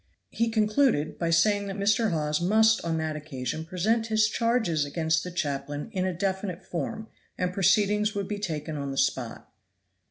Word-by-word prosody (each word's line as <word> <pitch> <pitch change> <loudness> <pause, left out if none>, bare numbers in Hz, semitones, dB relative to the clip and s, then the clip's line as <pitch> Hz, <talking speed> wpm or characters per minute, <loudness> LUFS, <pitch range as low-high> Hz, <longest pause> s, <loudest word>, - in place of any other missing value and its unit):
He 230 0 0
concluded 215 - +1
by 170 - 0
saying 200 +4 +3
that 195 - -4
Mr. 210 +3 +2
Hawes 150 -2 -1
must 220 +4 +4
on 165 -1 -1
that 160 -1 -2
occasion 150 0 -5
present 220 +7 0
his 220 -1 +3
charges 225 -9 +1
against 160 +3 0
the 180 - -5
chaplain 145 -1 -3
in 185 -2 -1
a - - 0
definite 190 0 -3
form, 215 +7 -4 0.3
and 180 0 -1
proceedings 205 +3 +2
would 200 -1 -2
be 205 0 -4
taken 155 -5 -4
on 140 -1 -4
the 135 - -5
spot. 130 -4 -1
180 Hz, 170 wpm, -27 LUFS, 155-215 Hz, 0.3 s, must